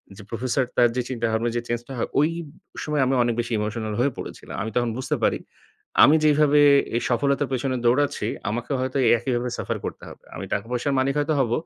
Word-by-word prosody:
যে 105 - -11
প্রফেসরটার 125 +2 -1
তার 120 -1 +5
যে 125 - +1
চিন্তাভাবনা 115 -1 -1
যে 120 - 0
চেঞ্জটা 120 +3 -4
হয় - - -2
ওই 150 +3 +4 0.5
সময় 150 -2 0
আমি 135 - +1
অনেক 120 -1 +1
বেশি 120 +1 -2
ইমোশনাল 110 0 -3
হয়ে 140 +2 +2
পড়েছিলাম। - - -8
আমি 110 - -3
তখন 120 -1 +1
বুঝতে 130 - -1
পারি, - - +2 0.7
"আমি 150 - +7
যেইভাবে 150 -1 +4 0.4
এ - - +2
সফলতার 140 +3 +1
পেছনে 130 +1 -1
দৌড়াচ্ছি 125 -3 +2 0.2
আমাকে 120 +5 -4
হয়তো 130 +1 -2 0.2
একইভাবে 120 0 -2
suffer - - -3
করতে - - -6
হবে। - - -14
আমি - - -5
টাকা-পয়সার 120 +6 -1
মালিক 135 +1 +1
হয়তো 150 +2 +1
হব 120 -4 +1
125 Hz, 190 wpm, -24 LUFS, 120-140 Hz, 0.7 s, আমি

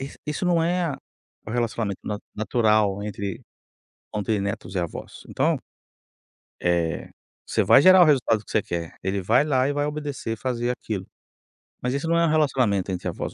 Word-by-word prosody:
isso 135 +1 -7
isso 150 +4 -2
não 170 -2 +3
é 175 +1 +1
a 145 - -3 0.5
o - - -6
relacionamento 115 -4 -1
na 105 - -3 0.2
natural 105 -2 +2
entre, 100 -2 -4 0.7
entre 105 0 0
netos 100 -1 -4
e - - +2
avós, 85 -2 -5
então, - - +1 1.0
eh, 85 -2 0 0.4
você - - +1
vai - - +7
gerar 185 +3 +8
o - - +5
resultado 125 -7 +3
que - - -11
você 105 - +2
quer, 85 -2 -5
ele 95 +1 -1
vai 115 +9 +4
lá 135 -3 +2
e 145 - 0
vai 145 0 0
obedecer, 145 -6 -4
fazer 120 0 -2
aquilo. 105 -6 -4 0.8
Mas 125 +1 -1
isso 140 +4 -2
não 170 0 +2
é 170 - +4
um - - +2
relacionamento 125 - +2
entre 90 - -3
avós, - - -4
115 Hz, 180 wpm, -24 LUFS, 100-145 Hz, 1.0 s, gerar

